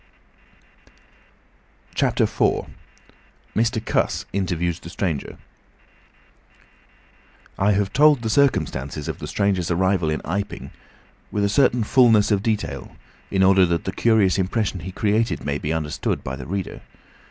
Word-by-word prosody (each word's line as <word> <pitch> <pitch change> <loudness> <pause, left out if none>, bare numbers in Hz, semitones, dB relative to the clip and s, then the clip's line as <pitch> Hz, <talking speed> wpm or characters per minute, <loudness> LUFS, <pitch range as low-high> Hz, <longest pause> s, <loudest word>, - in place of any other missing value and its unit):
CHAPTER - - +1
IV. - - +1 0.9
MR. 115 0 0
CUSS - - 0
INTERVIEWS 90 -3 -1
THE 85 - -10
STRANGER 85 -5 -3 2.2
I 100 +2 +3
have 100 -1 -1
told 145 -3 +5
the 110 - -1
circumstances 75 - 0
of - - -5
the - - -6
stranger's 95 -4 0
arrival 90 -1 +1
in 75 - -1
Iping 100 +4 -4 0.6
with 105 - -1
a 100 - +2
certain 125 0 +3
fulness 115 -3 +4
of 100 -2 +2
detail, 110 -1 -3 0.3
in 95 -1 +2
order 95 0 +5
that 85 -1 -1
the 95 - -3
curious 105 -3 +2
impression 95 0 -1
he 90 +3 -7
created 105 - 0
may 70 0 -1
be 75 - -3
understood 80 -2 -2
by 65 - -4
the 65 -1 -9
reader. 95 +1 -4
95 Hz, 130 wpm, -22 LUFS, 85-110 Hz, 2.2 s, told